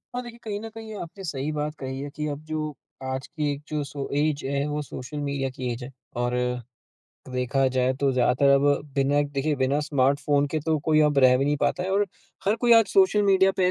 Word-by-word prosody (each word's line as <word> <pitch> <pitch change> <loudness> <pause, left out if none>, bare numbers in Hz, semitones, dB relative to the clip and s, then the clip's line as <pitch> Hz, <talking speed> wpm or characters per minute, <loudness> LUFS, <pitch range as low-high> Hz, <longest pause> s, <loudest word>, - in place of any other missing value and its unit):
हाँ 250 - -1
देखिए 235 -1 -10
कहीं 205 -2 -3
न 225 - -6
कहीं 220 -1 -8
आपने 185 +4 -9
सही 150 -3 -3
बात 150 0 -3
कही 130 0 -5
है 145 - -5
कि 150 - -3
अब 145 -1 -4
जो 155 -1 -3 0.4
आज 130 0 -4
की 150 -3 -2
एक 140 0 -5
जो 150 -1 -2
सो 140 0 -5
एज 150 -2 0
है 140 +1 0
वो 150 0 -2
सोशल 145 0 -7
मीडिया 140 -2 -2
की 125 -1 -4
एज 120 +2 -7
है। 125 - -7 0.3
और 120 0 0 1.0
देखा 125 +2 +1
जाए 130 0 +3
तो 140 -1 +3
ज़्यादातर 125 +2 +3
अब 140 +1 +3 0.3
बिना 140 +1 +2
देखिए 145 +1 -1
बिना 135 +2 +1
स्मार्टफ़ोन 145 0 +2
के 155 - +1
तो 160 -1 +2
कोई 155 -1 +5
अब 140 - +1
रह 130 -1 +6
भी 135 - +1
नहीं 145 +1 +1
पाता 180 - 0
है 185 - -2
और 200 +1 +2 0.4
हर 205 +3 +2
कोई 240 - +6
आज 225 - +3
सोशल 380 - +5
मीडिया 195 -1 +5
पे 185 - +2
है 180 - +4
145 Hz, 230 wpm, -25 LUFS, 135-160 Hz, 1.0 s, रह